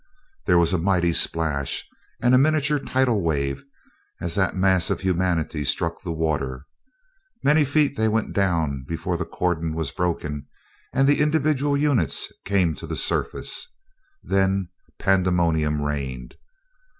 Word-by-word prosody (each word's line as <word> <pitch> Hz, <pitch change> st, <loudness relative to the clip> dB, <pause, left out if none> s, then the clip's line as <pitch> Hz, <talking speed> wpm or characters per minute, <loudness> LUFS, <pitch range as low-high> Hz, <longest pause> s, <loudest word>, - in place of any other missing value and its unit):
There 90 Hz, -3 st, +5 dB
was 85 Hz, +1 st, +3 dB
a 90 Hz, -, +2 dB
mighty 90 Hz, -1 st, +2 dB
splash 80 Hz, -5 st, 0 dB, 0.3 s
and 125 Hz, +1 st, +3 dB
a -, -, +7 dB
miniature 150 Hz, 0 st, +2 dB
tidal 130 Hz, -6 st, +1 dB
wave 70 Hz, -, -1 dB, 0.6 s
as 85 Hz, -1 st, -3 dB
that 95 Hz, +1 st, +1 dB
mass 95 Hz, -2 st, +2 dB
of -, -, -1 dB
humanity 90 Hz, -4 st, 0 dB
struck 85 Hz, +4 st, -1 dB
the 90 Hz, -, -5 dB
water. 75 Hz, -5 st, -2 dB, 0.8 s
Many 150 Hz, +2 st, +4 dB
feet 145 Hz, 0 st, +1 dB
they 110 Hz, -, +2 dB
went 110 Hz, 0 st, 0 dB
down 80 Hz, -9 st, 0 dB
before 85 Hz, +3 st, -2 dB
the 85 Hz, 0 st, -3 dB
cordon 85 Hz, -3 st, -2 dB
was 80 Hz, -4 st, -2 dB
broken 75 Hz, -5 st, -3 dB, 0.4 s
and 135 Hz, +1 st, +2 dB
the 145 Hz, +1 st, +3 dB
individual 150 Hz, -2 st, +1 dB
units 140 Hz, -, +1 dB
came 95 Hz, -5 st, +2 dB
to -, -, -8 dB
the -, -, -4 dB
surface. -, -, -2 dB, 0.5 s
Then 95 Hz, -1 st, +1 dB, 0.3 s
pandemonium 85 Hz, -5 st, +1 dB
reigned. 65 Hz, -4 st, -4 dB
90 Hz, 140 wpm, -23 LUFS, 80-110 Hz, 0.8 s, a